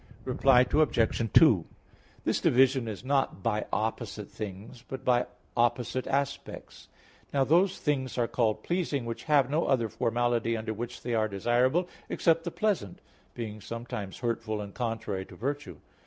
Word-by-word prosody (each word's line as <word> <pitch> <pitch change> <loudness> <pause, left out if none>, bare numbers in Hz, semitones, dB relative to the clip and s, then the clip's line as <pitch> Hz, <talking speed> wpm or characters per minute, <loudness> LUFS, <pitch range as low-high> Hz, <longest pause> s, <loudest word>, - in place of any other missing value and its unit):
Reply 130 -2 +5
Obj. 115 -6 +2
2: - - +6 0.6
This - - 0
division 130 -1 +4
is 110 +2 -6
not 135 -7 0
by 105 -2 0
opposite 110 -1 -3
things; 105 +3 -8
but 135 - -7
by 125 -1 +3 0.3
opposite 120 +1 +1
aspects. 140 0 -3 0.4
Now 140 -1 +3
those 175 +7 +3
things 135 -4 -1
are 120 -1 +2
called 115 -3 0
pleasing 165 -8 -1
which 115 0 -5
have 145 -4 +4
no 155 +3 +1
other 120 -5 +2
formality 115 +1 0
under 110 0 -3
which 120 +3 -6
they 120 - -2
are 110 -1 +2
desirable 120 - +1 0.2
except 165 -1 +2
the - - -1
pleasant, 185 - -1 0.4
being 110 -3 -6
sometimes 115 -4 -6
hurtful 115 -3 -2
and 100 -1 -7
contrary 115 -5 -3
to - - -13
virtue. 145 +5 -4
120 Hz, 150 wpm, -29 LUFS, 110-135 Hz, 0.6 s, 2